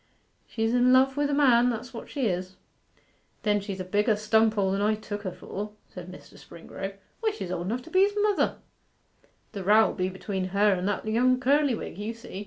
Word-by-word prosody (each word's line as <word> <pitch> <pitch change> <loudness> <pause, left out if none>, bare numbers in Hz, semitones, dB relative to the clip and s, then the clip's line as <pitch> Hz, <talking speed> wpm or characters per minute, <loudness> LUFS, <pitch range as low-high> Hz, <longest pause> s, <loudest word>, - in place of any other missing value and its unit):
She's 225 0 -1
in 245 +1 +4
love 260 +1 +4
wi' 290 0 +1
the 285 - -1
man, 250 -4 +5
that's 240 +2 -5
what 230 - -8
she 275 -4 -2
is.' 185 -1 -2 0.9
'Then 210 -1 +2
she's 195 -1 -6
a - - -2
bigger 210 +4 +2
stunpoll 215 -2 +2
than 195 +1 -1
I 215 +1 +2
took 210 -1 -6
her 190 -3 -4
for,' 210 +4 -7 0.2
said 180 0 -9
Mr. 185 - -14
Springrove. 195 +3 -8 0.2
'Why, 450 - +1
she's 410 - -6
old 175 0 -3
enough 240 +5 -2
to 325 - -14
be 370 - +3
his 405 +1 +3
mother.' 420 -2 +1 1.0
'The 200 -3 -6
row'll 215 +3 +4
be 185 -1 -1
between 190 0 -4
her 200 +2 +3
and 185 +1 -2
that 205 +1 -2
young 250 +4 +2
Curlywig, 270 -5 +1
you'll 220 +3 -4
see. 225 -4 -9
215 Hz, 200 wpm, -27 LUFS, 195-250 Hz, 1.0 s, man